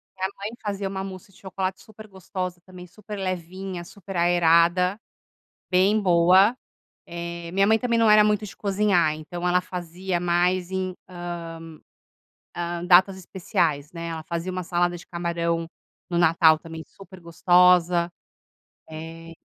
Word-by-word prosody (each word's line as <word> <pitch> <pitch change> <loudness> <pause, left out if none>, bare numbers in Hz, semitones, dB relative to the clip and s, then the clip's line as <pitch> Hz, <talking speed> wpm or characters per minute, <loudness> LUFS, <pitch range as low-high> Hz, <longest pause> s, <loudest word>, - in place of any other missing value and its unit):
Minha 190 0 -1
mãe 200 +2 -5
fazia 200 -2 -3
uma 190 0 -4
mousse 190 0 -9
de 195 - -22
chocolate 190 0 -4
super 215 0 -14
gostosa, 185 -2 -6
também 180 -1 -12
super 210 +3 -9
levinha, 185 -1 -5
super 195 +1 -11
aerada, 175 +2 +3 0.7
bem 190 +4 +3
boa. 185 +4 +5 0.5
Eh, 170 0 -7
minha 195 +2 +3
mãe 220 +2 +3
também 235 -1 0
não 225 -1 +4
era 210 0 +7
muito 210 0 +1
de 200 - -11
cozinhar, 195 -5 +1
então 175 +3 -5
ela 180 0 +3
fazia 180 0 -4
mais 175 +1 +1
em, 185 -1 -2 0.2
hã, 170 -2 -7 0.8
hã, 175 0 -4
datas 185 +2 +5
especiais, 165 -5 -2
né? 170 -1 -6
Ela 160 -1 -5
fazia 170 +2 -4
uma 185 0 -4
salada 175 0 0
de - - -13
camarão 170 -1 -2 0.4
no 175 - -1
Natal 160 -1 +5
também, 160 0 -9
super 190 -1 -14
gostosa. 175 0 +3 0.8
Eh, 165 +1 -9
180 Hz, 145 wpm, -24 LUFS, 170-190 Hz, 0.8 s, era